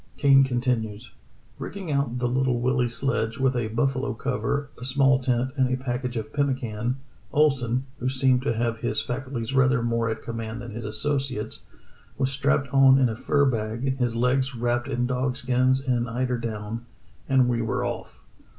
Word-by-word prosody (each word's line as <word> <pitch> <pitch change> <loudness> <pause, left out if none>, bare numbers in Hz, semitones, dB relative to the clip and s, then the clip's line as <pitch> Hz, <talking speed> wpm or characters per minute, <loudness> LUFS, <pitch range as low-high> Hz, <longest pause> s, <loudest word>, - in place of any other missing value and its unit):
Kane 135 -1 +6
continues: 120 -4 -1 0.5
"Rigging 190 -5 -5
out 140 -4 0
the 125 0 0
Little 125 0 +1
Willie 125 0 +1
sledge 115 -2 -1
with 130 -1 +2
a 120 -2 0
buffalo 130 +3 0
cover, 140 +3 -2
a - - -8
small 135 +1 +3
tent, 125 0 0
and 130 -2 +2
a 130 - +1
package 125 -1 -3
of 110 0 -5
pemmican, 125 -4 -1 0.4
Ohlsen 130 -4 +2 0.2
(who 125 - 0
seemed 130 -1 +2
to 125 -3 0
have 115 0 -1
his 110 -1 0
faculties 120 +1 -4
rather 130 -2 +3
more 115 -1 0
at 110 - -4
command 115 -1 -5
than 120 -1 -7
his 115 +1 -6
associates) 135 0 -2 0.6
was 135 -1 0
strapped 140 0 0
on 135 -1 +7
in 130 -3 +3
a 110 - -3
fur 140 +4 +2
bag, 120 +2 -1
his 120 -2 0
legs 125 +2 +1
wrapped 120 +1 0
in 125 -3 0
dog 130 +1 -1
skins 130 0 +2
and 125 -3 -1
eider 125 +1 -1
down, 115 0 -4 0.5
and 130 -2 +4
we 120 -1 +1
were 115 - -1
off. - - -5
125 Hz, 175 wpm, -25 LUFS, 115-135 Hz, 0.6 s, on